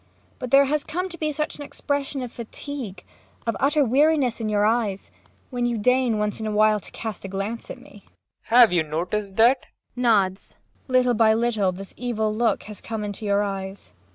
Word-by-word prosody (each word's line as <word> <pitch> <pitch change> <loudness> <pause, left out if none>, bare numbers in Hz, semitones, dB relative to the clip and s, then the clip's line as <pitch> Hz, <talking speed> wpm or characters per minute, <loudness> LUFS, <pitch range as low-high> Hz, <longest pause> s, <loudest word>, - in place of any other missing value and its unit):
But 255 - -5
there 275 +2 +6
has 295 +2 0
come 360 +4 -3
to 340 - -8
be 310 -1 0
such 300 +1 -3
an - - -10
expression 285 -1 -3
of 245 - -6
fatigue, 235 -4 -7 0.4
of 230 - 0
utter 290 +1 +3
weariness, 270 -1 +2
in 215 - -1
your 205 0 +2
eyes 215 -3 0 0.4
when 245 -1 0
you 240 -1 -1
deign, 250 +1 +2
once 210 0 -1
in 220 - -3
a - - -1
while, 215 0 +4
to - - -9
cast 220 -4 -6
a - - -5
glance 195 +4 -4
at - - -6
me. - - -15
PROFESSOR - - -30
RUBEK. - - -33
Have 235 -4 +7
you 175 - +4
noticed 180 +6 -3
that? 240 +4 +5 0.4
MAIA. 250 - -5
[Nods.] 200 -5 +1 0.3
Little 255 -1 +3
by 220 -1 +4
little 220 -5 +1
this 195 +2 -9
evil 220 -3 -1
look 230 +1 +1
has 210 -2 -10
come 225 -2 -4
into 205 +1 -5
your 200 0 +2
eyes. 195 -1 -5
225 Hz, 210 wpm, -24 LUFS, 205-255 Hz, 0.4 s, Have